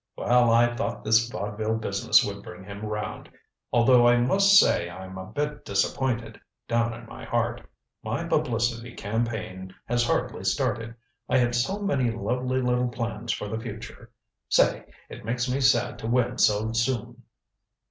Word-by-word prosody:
"Well, 120 -1 +3
I 120 +1 +4
thought 135 - -3
this 110 +2 +3
vaudeville 110 0 -3
business 110 - +3
would - - -5
bring 90 +1 -11
him 100 +2 -9
round. 105 -2 -5 0.4
Although 120 0 +5
I 120 0 +5
must 195 +12 +5
say 85 - +4
I'm 95 +1 -9
a 95 0 -7
bit 150 +7 -3
disappointed 115 +4 -1 0.3
down 115 0 0
in 120 0 -11
my - - -11
heart. 120 0 -1 0.4
My - - -3
publicity 120 0 -1
campaign 105 -4 -4
has 120 0 +1
hardly - - -1
started. 115 0 -1 0.3
I - - +3
had 120 -1 +2
so 120 +12 0
many 135 -11 +1
lovely 125 +3 -1
little 125 0 +1
plans 115 -1 -4
for 105 - -3
the 110 +2 -4
future 115 0 -9 0.4
say, - - +3 0.2
it - - -10
makes 120 +3 -1
me 130 +2 -1
sad 135 +1 +2
to 110 - -5
win 125 +1 +1
so 110 +1 +3
soon." 120 +1 -2
115 Hz, 160 wpm, -26 LUFS, 110-125 Hz, 0.4 s, Although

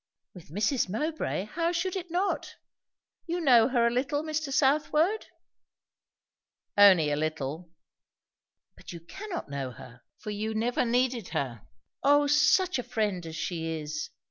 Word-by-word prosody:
"With 180 -4 -13
Mrs. 210 - 0
Mowbray, 300 - -2
how 335 +9 -1
should 360 +2 -1
it 365 -2 -5
not? 360 +4 -1 0.7
You 345 +1 -1
know 245 -8 +5
her 245 -3 +2
a 235 - +3
little, 280 +5 -1
Mr. 310 -2 -3
Southwode?" 305 +8 +2 1.5
"Only 185 -7 +6
a - - +1
little." 155 +2 -3 1.1
"But - - -11
you 170 - -7
cannot 350 - -7
know 140 -2 -3
her, 125 -1 -13 0.2
for 210 - -6
you 215 +1 -3
never 240 +3 0
needed 245 -2 0
her. 120 -6 -4 0.3
O 290 +1 +4
such 300 +3 +3
a - - -3
friend 205 -8 -2
as 160 - -7
she 165 0 -3
is! 150 0 -5
235 Hz, 145 wpm, -28 LUFS, -, 1.5 s, Only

